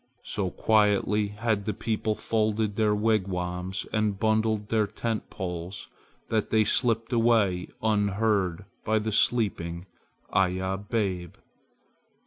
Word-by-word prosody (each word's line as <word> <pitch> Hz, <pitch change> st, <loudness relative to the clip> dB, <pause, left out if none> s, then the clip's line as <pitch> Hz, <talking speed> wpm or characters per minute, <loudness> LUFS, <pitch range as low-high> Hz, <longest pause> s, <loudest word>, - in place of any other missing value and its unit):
So 95 Hz, -3 st, -2 dB
quietly 105 Hz, 0 st, +2 dB
had 105 Hz, 0 st, -1 dB
the 105 Hz, -, -2 dB
people 110 Hz, -1 st, -1 dB
folded 110 Hz, -1 st, 0 dB
their 105 Hz, -1 st, +2 dB
wigwams 95 Hz, -4 st, -1 dB
and 105 Hz, -2 st, 0 dB
bundled 110 Hz, -1 st, +1 dB
their 110 Hz, -2 st, +2 dB
tent 115 Hz, +1 st, -3 dB
poles 90 Hz, +1 st, -6 dB, 0.4 s
that 110 Hz, -2 st, 0 dB
they 110 Hz, -1 st, +4 dB
slipped 115 Hz, +2 st, +1 dB
away 115 Hz, -6 st, +3 dB, 0.2 s
unheard 105 Hz, -3 st, +1 dB, 0.2 s
by 110 Hz, 0 st, +1 dB
the 110 Hz, +1 st, -1 dB
sleeping 95 Hz, -7 st, +1 dB, 0.5 s
Iya 95 Hz, +1 st, +1 dB
babe. 95 Hz, -7 st, -1 dB
105 Hz, 115 wpm, -27 LUFS, 95-110 Hz, 0.5 s, they